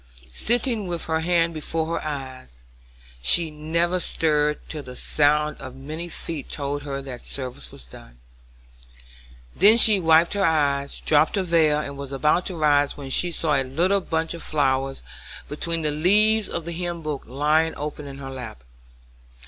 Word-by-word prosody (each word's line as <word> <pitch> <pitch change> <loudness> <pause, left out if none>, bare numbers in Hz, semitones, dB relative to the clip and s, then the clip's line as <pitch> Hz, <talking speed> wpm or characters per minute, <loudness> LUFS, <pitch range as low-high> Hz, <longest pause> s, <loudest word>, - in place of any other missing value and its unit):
Sitting 230 - 0
with 170 -1 -2
her 160 0 0
hand 170 0 +1
before 160 +1 -2
her - - -9
eyes, 130 - -7 0.6
she 160 - +3
never 170 +4 0
stirred 150 -3 +1
till 155 - -6
the 125 -2 -10
sound 150 +3 +1
of 130 - -9
many 155 +6 -6
feet 160 -3 -5
told 145 0 -3
her 140 -1 -5
that 125 -3 -8
service 125 - -5
was - - -10
done. - - -15 1.4
Then 215 +3 +6
she 215 -3 +7
wiped 165 0 +4
her 200 -1 0
eyes, 140 -4 +1
dropped 155 +4 +3
her 195 - +1
veil, 160 -4 +3
and 140 -2 -5
was 140 -1 -6
about 150 +6 +1
to 185 - -4
rise 145 -3 +2
when 135 -2 -7
she 175 - +2
saw 160 -2 0
a 135 - +2
little 175 +10 +1
bunch 160 -2 -2
of 170 - -8
flowers 135 - -1 0.4
between 165 +2 -2
the 150 - +1
leaves 210 +7 +3
of 170 -2 -4
the 170 - -4
hymn 170 -1 -4
book 150 -2 -4
lying 150 +5 +1
open 150 0 -5
in 135 -1 -9
her 135 -1 -7
lap. 120 - -8
150 Hz, 170 wpm, -23 LUFS, 140-170 Hz, 1.4 s, she